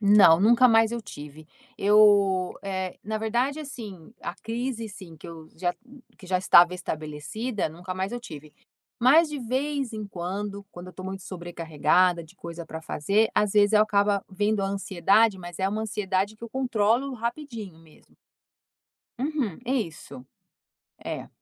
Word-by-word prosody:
Não, 200 -5 +7
nunca 240 +4 +6
mais 225 0 +4
eu 235 - -3
tive. 150 -6 -11 0.3
Eu, 200 -3 +4
eh, 190 -2 -4
na 215 +1 -3
verdade, 240 +7 0
assim, 220 - -9
a - - -5
crise 230 0 -4
sim, 185 -6 -12
que - - -12
eu 165 -2 -10
já 175 +1 -1 0.4
que 190 - -13
já 185 0 +1
estava 180 -1 +6
estabelecida, 160 +8 -4
nunca 180 +4 -7
mais 190 +4 -3
eu 240 - -4
tive. 155 - -10 0.5
Mas 300 +7 +6
de 295 - -5
vez 265 +1 -2
em 215 -1 -5
quando, 200 +2 -5
quando 175 +1 -10
eu 185 - -11
tô 185 - -9
muito 190 0 -6
sobrecarregada 175 0 +1
de 165 - -19
coisa 170 -1 -8
pra 160 +1 -7
fazer, 200 +9 +1
às 210 -2 +2
vezes 205 0 +4
eu 210 0 +6
acaba 205 -1 +2
vindo 205 +2 0
a - - 0
ansiedade, 195 +2 +2
mas 175 -1 -9
é 190 +1 +1
uma 215 +2 -2
ansiedade 205 0 -1
que 230 +1 -9
controlo 250 +1 0
rapidinho 230 - -5
mesmo. 160 -2 -22 1.0
Uhum, 270 - -2
isso, 165 - -4 0.8
é. - - -5
200 Hz, 155 wpm, -26 LUFS, 175-225 Hz, 1.0 s, Não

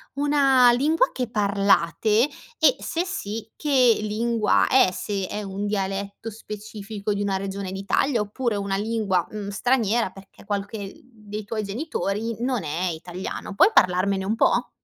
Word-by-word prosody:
una 275 -4 +5
lingua 295 +7 +2
che 250 -3 -3
parlate, 205 - +2 0.3
e 280 -5 +5
se 335 +2 -2
sì, 225 - -5
che 260 -6 +4
lingua 220 +1 +1
è, 260 -7 +5
se 195 0 -3
è 210 0 -4
un 200 +1 -4
dialetto 200 +2 -3
specifico 210 -1 -6
di 200 - -2
una 195 -1 0
regione 195 -1 -4
d'Italia, 205 +6 0
oppure 220 +2 -2
una 200 -1 -2
lingua, 205 -4 0
mhmm, 210 -2 -6
straniera, 230 0 +1
perché 195 +1 -16
qualche 200 0 -4
dei 215 -4 -8
tuoi 215 +1 -3
genitori 220 -2 -3
non 250 -4 -1
è 160 +4 -2
italiano. 175 +4 -6
Puoi 290 - +6
parlarmene 190 - +3
un 215 - 0
po'? - - +2
210 Hz, 145 wpm, -24 LUFS, 195-235 Hz, 0.3 s, Puoi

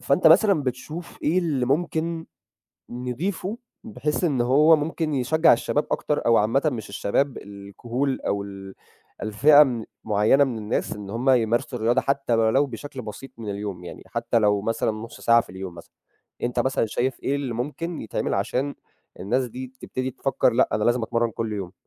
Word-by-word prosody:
فأنت 150 +5 +2
مثلًا 175 -1 +6
بتشوف 150 +7 -5
إيه 165 +5 +2
اللي 150 -8 0
ممكن 165 +3 -1 0.6
نضيفه 160 - -3 0.3
بحيث 180 -7 -2
إن 140 -7 +1
هو 145 +7 +5
ممكن 155 0 -2
يشجّع 155 +5 +4
الشباب 145 +5 0
أكتر 150 - -1
أو 115 -1 +5
عامةً 115 +6 +2
مش 110 -4 -6
الشباب 110 +7 -1
الكهول 115 +7 -4
أو 100 0 -1
ال 95 -1 -9 0.5
الفئة 140 +8 +6
من 120 -5 0 0.2
معيّنة 105 +7 +4
من 125 -4 -3
الناس 105 0 -2
إن 100 -1 -7
هم 125 +5 +1
يمارسوا 120 0 +1
الرياضة 120 +3 +2
حتّى 140 -3 0
ولو 115 +5 +3
بشكل 130 +1 -8
بسيط 110 +5 -8
من 110 -3 -5
اليوم، 100 -3 -5
يعني 85 - -9
حتّى 115 - 0
لو 105 -2 +3
مثلًا 115 0 0
نُص 110 +2 -8
ساعة 115 0 +5
في - - -10
اليوم 95 -1 -7
مثلًا. 85 - -13 0.5
أنت 120 0 -1
مثلًا 130 -3 +1
شايف 125 +4 -2
إيه 140 - 0
اللي 135 -4 -3
ممكن 150 +7 -4
يتعمل 110 - -2
عشان 125 +8 -1 0.5
الناس 125 +8 0
دي 130 +2 -8
تبتدي 130 0 -3
تفكّر 135 -1 +1
لأ، 120 - +3
أنا 105 0 0
لازم 120 +1 +2
أتمرّن 115 +1 0
كل 110 0 -4
يوم؟ 95 -4 -5
125 Hz, 175 wpm, -24 LUFS, 110-145 Hz, 0.6 s, مثلًا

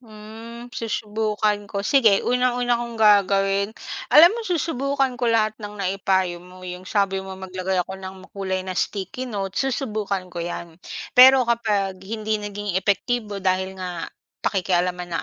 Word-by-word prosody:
Hmm, 230 +2 -11
susubukan 215 -2 -1
ko, 200 0 -3
sige 225 -8 +4
unang-una 245 0 +1
kong 235 -1 -6
gagawin 200 -1 +4 0.4
alam 340 +6 +8
mo 470 - -4
susubukan 275 -5 0
ko 240 - +2
lahat 220 -2 +3
ng 210 0 -7
naipayo 190 -2 0
mo 180 +1 -14
'yong 180 +1 -7
sabi 195 -2 +1
mong 190 0 -8
maglagay 185 0 -2
ako 190 0 -8
ng 190 0 -9
makulay 190 -1 -4
na 185 - -4
sticky 205 +7 -3
note 195 -4 -3
susubukan 210 -8 -2
ko 175 - -4
yan. 170 0 -6 0.3
Pero 260 0 +8
kapag 205 -5 0
hindi 215 +2 -3
naging 205 -2 -3
epektibo 205 0 -1
dahil 190 +1 0
nga 180 -2 -5 0.3
pakikialaman 180 -2 0
ng - - -11
205 Hz, 145 wpm, -23 LUFS, 190-230 Hz, 0.4 s, alam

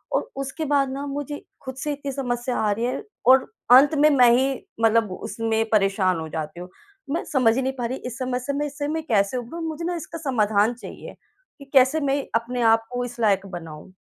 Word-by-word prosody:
और 475 - -1
उसके 290 +4 -5
बाद 280 -2 +2
ना, 280 +1 -4
मुझे 290 +1 -5 0.2
खुद 260 -1 -7
से 295 +2 -3
इतनी 280 -1 -5
समस्या 245 -2 -2
आ 210 -1 +1
रही 225 +4 -1
है 250 - -3 0.2
और 260 0 +6 0.2
अंत 275 +5 +8
में 300 +1 +6
मैं 250 -4 +6
ही 270 +1 +1 0.3
मतलब 225 -2 +3
उसमें 225 +4 -2
परेशान 195 -4 +2
हो 160 - -5
जाती 160 +2 -5
हूँ। 180 +1 -8 0.4
मैं 335 - -1
समझ 240 -4 +4
ही 265 - +1
नहीं 265 0 -1
पा 240 - -2
रही, 255 +3 -3
इस 245 -2 -7
समस्या 255 +2 -2
में 295 - 0
इससे 290 0 -4
मैं 320 +1 -2
कैसे 205 +2 +2
उभरूँ? 250 +8 -6
मुझे 320 +1 -5
ना 350 0 -1
इसका 330 0 -7
समाधान 220 -6 +1
चाहिए 240 - -10 0.4
कि 280 - -11
कैसे 265 +4 +5
मैं 280 -1 0
अपने 240 +2 -1
आप 225 0 +1
को 245 0 -2
इस 245 0 -9
लायक 200 -3 +2
बनाऊँ? 170 -1 -9
250 Hz, 215 wpm, -23 LUFS, 220-280 Hz, 0.4 s, अंत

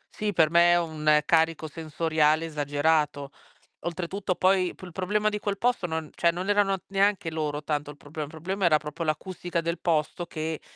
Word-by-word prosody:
Sì, 210 -1 -1
per 160 -4 +3
me 170 0 +6
è - - +5
un 155 -2 +2
carico 160 -1 +2
sensoriale 155 0 +1
esagerato. 145 -1 0 0.5
Oltretutto, 180 +2 -2
poi 185 -1 +2
p - - -16
il 180 - -8
problema 210 +4 0
di 210 0 -3
quel 200 -1 -2
posto 240 -5 0
non 160 -1 -3
cioè 170 - +2
non 180 +3 -4
erano 205 -1 +3
neanche 195 -3 +1
loro 150 -2 -3
tanto 150 -1 -2
il 145 - -10
problema. 145 +1 -6
Il - - -13
problema 185 +5 -2
era 155 -3 +5
proprio 150 +2 -8
l'acustica 175 +2 -2
del 170 0 -2
posto 170 +1 -1
che 160 -1 -4
165 Hz, 185 wpm, -27 LUFS, 155-185 Hz, 0.5 s, me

